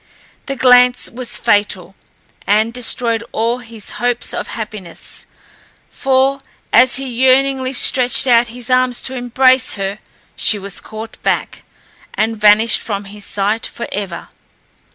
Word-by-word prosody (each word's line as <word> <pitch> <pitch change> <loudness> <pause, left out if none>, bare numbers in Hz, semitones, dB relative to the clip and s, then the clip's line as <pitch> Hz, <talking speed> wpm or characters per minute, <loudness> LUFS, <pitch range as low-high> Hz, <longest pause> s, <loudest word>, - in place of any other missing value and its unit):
The 275 - -3
glance 250 -1 +4
was 250 0 -2
fatal, 205 -4 0 0.5
and 215 +3 +2
destroyed 235 -1 0
all 230 +3 -1
his 225 -3 -8
hopes 245 0 -1
of - - -4
happiness; 210 -6 -7 0.6
for, 270 +1 +1 0.3
as 255 +2 +5
he 270 +1 -2
yearningly 260 +1 +1
stretched 250 -1 +3
out 240 -2 +4
his 245 +2 -6
arms 255 -1 +2
to 260 - -5
embrace 255 0 +2
her, 195 0 -4 0.4
she 215 - +2
was 200 -1 -5
caught 220 +1 -10
back, - - -2 0.5
and 225 +1 0
vanished 210 +2 +4
from 200 -2 -4
his 205 +1 -9
sight 210 +3 -1
for 235 - -7
ever. 195 -4 -5
235 Hz, 135 wpm, -16 LUFS, 210-255 Hz, 0.6 s, as